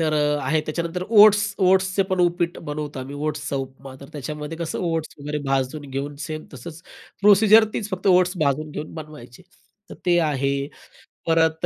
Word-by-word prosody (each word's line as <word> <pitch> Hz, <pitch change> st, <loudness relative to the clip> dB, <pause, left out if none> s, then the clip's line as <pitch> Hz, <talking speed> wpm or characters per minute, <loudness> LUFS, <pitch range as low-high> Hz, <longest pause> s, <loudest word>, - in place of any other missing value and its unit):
तर 155 Hz, -1 st, +1 dB
अ, 150 Hz, 0 st, +1 dB
आहे. 155 Hz, +4 st, +1 dB
त्याच्यानंतर 170 Hz, +3 st, -4 dB
ओट्स 210 Hz, -1 st, +6 dB
ओट्सचे 190 Hz, +1 st, +3 dB
पण 185 Hz, -1 st, +1 dB
उपीट 175 Hz, 0 st, 0 dB
बनवतो 150 Hz, -1 st, -5 dB
आम्ही, 135 Hz, +2 st, -7 dB
ओट्सचा 150 Hz, -2 st, -3 dB
उपमा, 135 Hz, 0 st, -7 dB
तर 140 Hz, -, -11 dB
त्याच्यामध्ये 150 Hz, +3 st, -6 dB
कसं 165 Hz, -1 st, -3 dB
ओट्स 165 Hz, -1 st, -3 dB
वगैरे 150 Hz, +1 st, -3 dB
भाजून 135 Hz, +2 st, -1 dB
घेऊन 140 Hz, +2 st, -4 dB
सेम 155 Hz, 0 st, -6 dB
तसंच, 155 Hz, +6 st, -10 dB, 0.4 s
प्रोसिजर 210 Hz, +2 st, +6 dB
तेच, 210 Hz, -, -3 dB
फक्त 185 Hz, +2 st, -4 dB
ओट्स 180 Hz, -1 st, +4 dB
भाजून 150 Hz, +2 st, -1 dB
घेऊन 150 Hz, +1 st, -7 dB
बनवायची. 150 Hz, -3 st, -11 dB, 0.5 s
तर -, -, -7 dB
ते 175 Hz, -1 st, +4 dB
आहे. 140 Hz, 0 st, 0 dB, 0.8 s
परत 160 Hz, -1 st, +2 dB
155 Hz, 165 wpm, -23 LUFS, 145-180 Hz, 0.8 s, ओट्स